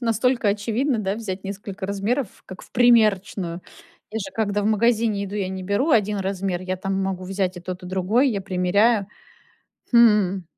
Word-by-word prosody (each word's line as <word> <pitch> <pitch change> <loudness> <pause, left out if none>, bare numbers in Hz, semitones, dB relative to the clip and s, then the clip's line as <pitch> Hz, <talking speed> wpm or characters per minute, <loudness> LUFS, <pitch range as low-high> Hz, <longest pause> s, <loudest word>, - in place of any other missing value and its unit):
настолько 235 -1 +1
очевидно, 225 +5 0
да, 195 -1 -1
взять 200 -4 -6
несколько 200 0 -6
размеров, 205 +4 -2
как 185 - -10
в - - -16
примерочную. 205 -7 +3 0.5
Я 220 - -2
же 190 -2 -6
когда 205 -2 0
в - - 0
магазине 220 -1 +2
иду, 200 +1 -7
я 195 -3 -2
не 190 0 -5
беру 205 - 0
1 210 -4 +2
размер. 190 -2 -2
Я 185 0 -3
там 195 +1 -3
могу 185 -1 -3
взять 190 -1 -2
и - - -7
тот 185 +1 -6
и 180 - -8
другой, 195 +9 +2
я 200 -3 -2
примеряю. 200 +3 +2 0.8
Хм. 210 -6 +4
200 Hz, 175 wpm, -23 LUFS, 190-220 Hz, 0.8 s, Хм